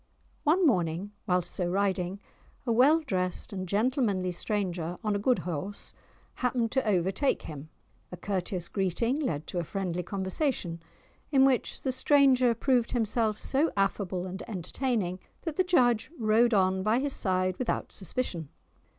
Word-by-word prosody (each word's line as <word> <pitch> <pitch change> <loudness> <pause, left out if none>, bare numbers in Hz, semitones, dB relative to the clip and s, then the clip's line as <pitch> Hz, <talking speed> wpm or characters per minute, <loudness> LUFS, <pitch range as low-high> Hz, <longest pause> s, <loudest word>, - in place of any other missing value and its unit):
One 340 +5 +3
morning, 180 - +1 0.2
whilst 180 -2 +1
so 180 - 0
riding, 190 0 0 0.5
a 240 - 0
well 275 +8 +5
dressed 185 - -2
and 185 -2 -5
gentlemanly 205 -4 +1
stranger, 180 -3 -2
on 210 -2 0
a - - 0
good 250 +4 +2
horse, 180 +4 -5 0.4
happened 245 -2 0
to 265 - +1
overtake 195 +7 +1
him; 150 0 -8 0.4
a 180 - -7
courteous 185 -1 -2
greeting 220 - 0
led 160 - -2
to 175 - -3
a - - -1
friendly 180 0 -3
conversation, 190 - -2 0.5
in 270 -2 +6
which 265 -2 +1
the 265 - +1
stranger 260 -2 +4
proved 245 -1 +1
himself 220 -2 0
so 285 +5 +1
affable 195 -2 0
and 190 +1 -6
entertaining 195 -1 -2 0.2
that 325 -4 -3
the 370 - +4
judge 245 -11 +3
rode 225 +1 +3
on 190 -1 +2
by 215 +4 +2
his 275 +1 0
side 185 -1 +1
without 255 - -2
suspicion. 180 - -3
200 Hz, 150 wpm, -29 LUFS, 180-250 Hz, 0.5 s, in